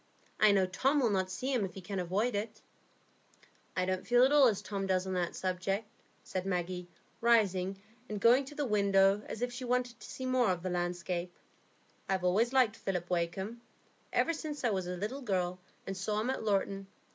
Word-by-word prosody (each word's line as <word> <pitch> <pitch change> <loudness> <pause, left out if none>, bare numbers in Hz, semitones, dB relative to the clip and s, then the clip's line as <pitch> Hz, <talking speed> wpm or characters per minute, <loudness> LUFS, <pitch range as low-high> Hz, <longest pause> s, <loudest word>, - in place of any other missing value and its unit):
I 215 -1 +7
know 195 -2 +4
Tom 265 +11 +1
will 240 -5 +2
not 190 -2 0
see 255 +9 -2
him 240 -5 +1
if 180 -3 -5
he 190 - -7
can 195 +1 -4
avoid 195 +7 0
it." 210 +2 -3 1.2
"I 185 - +2
don't 185 0 -2
feel 245 0 +5
at 265 - +5
all 290 -3 +7
as 210 -4 0
Tom 195 -2 -3
does 185 -1 +1
on 190 - -3
that 175 -2 -1
subject," 190 +3 -2 0.4
said 185 -1 -3
Maggie, 180 -1 -2 0.3
rising 195 -5 +3 0.3
and 210 -1 -3
going 245 +6 +5
to 295 +2 -10
the 290 - -1
window 200 -2 +3
as 225 - -4
if 245 0 -2
she 250 +1 -6
wanted 245 -1 -1
to - - -11
see 260 - -6
more 255 -4 +3
of 180 -2 -1
the 185 - -2
landscape. 175 0 -2 0.8
"I've 190 -1 0
always 205 +7 +3
liked 250 -5 +3
Philip 180 -2 -3
Wakem 180 +6 -1 0.5
ever 330 - +2
since 300 -3 -5
I 240 - +2
was 190 -3 -1
a 180 0 -3
little 215 +9 -4
girl, 185 -6 -1 0.3
and 195 - -4
saw 210 +3 -1
him 235 +4 0
at 265 - -3
Lorton. 195 -2 0
195 Hz, 205 wpm, -32 LUFS, 185-240 Hz, 1.2 s, I